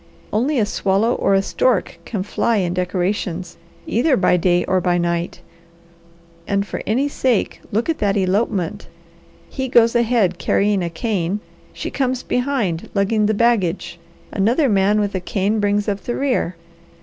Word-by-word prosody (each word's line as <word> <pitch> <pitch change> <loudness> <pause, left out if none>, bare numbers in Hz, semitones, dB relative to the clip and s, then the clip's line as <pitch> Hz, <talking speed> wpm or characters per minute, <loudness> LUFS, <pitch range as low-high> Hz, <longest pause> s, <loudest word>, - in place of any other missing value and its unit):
Only 260 +7 +1
a 220 - +3
swallow 205 +3 +1
or 195 - +2
a 195 - +2
stork 195 -7 0
can 205 -5 -3
fly 230 +3 0
in 180 -3 0
decorations, 180 -1 -2 0.3
either 260 +5 +2
by 180 - +3
day 175 0 +2
or 185 0 +1
by 175 0 +1
night. 170 0 -2 1.1
And 200 0 0
for - - -5
any 255 +7 +1
sake 255 -6 0
look 220 +4 0
at 325 -1 -1
that 205 -1 +1
elopement! 190 -2 -1 0.6
He 265 0 -4
goes 235 -1 +4
ahead 225 -7 +2
carrying 205 -1 +1
a 170 - -2
cane, 190 +1 -2 0.3
she - - -6
comes 260 -2 -1
behind 245 -10 -1
lugging 205 +2 +2
the 215 - +1
baggage, 200 -7 +1 0.3
another 235 +9 +2
man 200 +1 +3
with 205 -1 -1
a 190 - -1
cane 205 +3 0
brings 205 0 +1
up 200 -1 -1
the 240 - -3
rear. 255 -10 0
205 Hz, 160 wpm, -20 LUFS, 185-235 Hz, 1.1 s, goes